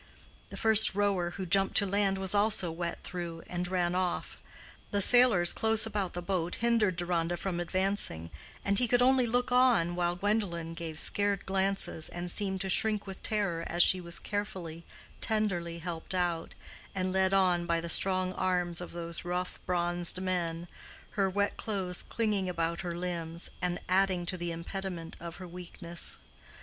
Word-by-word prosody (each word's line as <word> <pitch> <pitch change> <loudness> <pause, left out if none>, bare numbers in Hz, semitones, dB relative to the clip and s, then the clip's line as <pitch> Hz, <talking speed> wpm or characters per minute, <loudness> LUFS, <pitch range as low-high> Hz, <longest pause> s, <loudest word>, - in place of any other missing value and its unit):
The - - -9
first 220 -3 +4
rower 200 -4 +1
who 190 - -4
jumped 195 +2 +3
to 200 - +6
land 200 0 +1
was 190 0 +2
also 205 -4 +2
wet 170 +1 -5
through, 170 -2 -6
and 180 0 -4
ran 175 -1 0
off; 180 -1 -2 0.5
the 205 - 0
sailors, 220 -5 +7
close 220 0 +3
about 205 -4 -3
the 175 - -5
boat, 175 -2 -1
hindered 230 -5 +2
Deronda 175 -1 -1
from 180 -2 -3
advancing, 185 - -1 0.3
and 200 0 +5
he 245 - +3
could 245 +1 +3
only 255 -1 +4
look 245 +2 0
on 245 -9 +4
while 175 0 0
Gwendolen 180 -4 -1
gave 165 -2 -6
scared 205 0 +2
glances, 190 -4 -1
and 175 0 -5
seemed 190 -1 0
to 195 - -1
shrink 210 +2 +1
with 190 -2 -8
terror 195 -6 0
as 175 +1 +5
she 185 - +3
was 170 0 -4
carefully, 180 -5 -5 0.4
tenderly 180 -6 -1
helped 170 +1 -5
out, 175 -2 -1 0.4
and 185 -1 -1
led 190 0 +2
on 180 -3 +2
by 170 -1 +1
the 170 - -5
strong 185 +2 +3
arms 180 -2 -1
of 175 - -8
those 170 0 -5
rough, 180 +1 -3
bronzed 175 0 0
men, 175 -2 -2 0.4
her 195 -2 +1
wet 200 +2 -1
clothes 190 -4 -2
clinging 210 -5 -1
about 170 -1 -2
her 175 -2 -4
limbs, 170 -1 -3
and 175 0 -1
adding 185 -1 +2
to 185 - -2
the 175 -1 -4
impediment 170 0 -6
of 170 -1 -7
her 185 - -9
weakness. 175 -1 -1
180 Hz, 170 wpm, -30 LUFS, 175-200 Hz, 0.5 s, sailors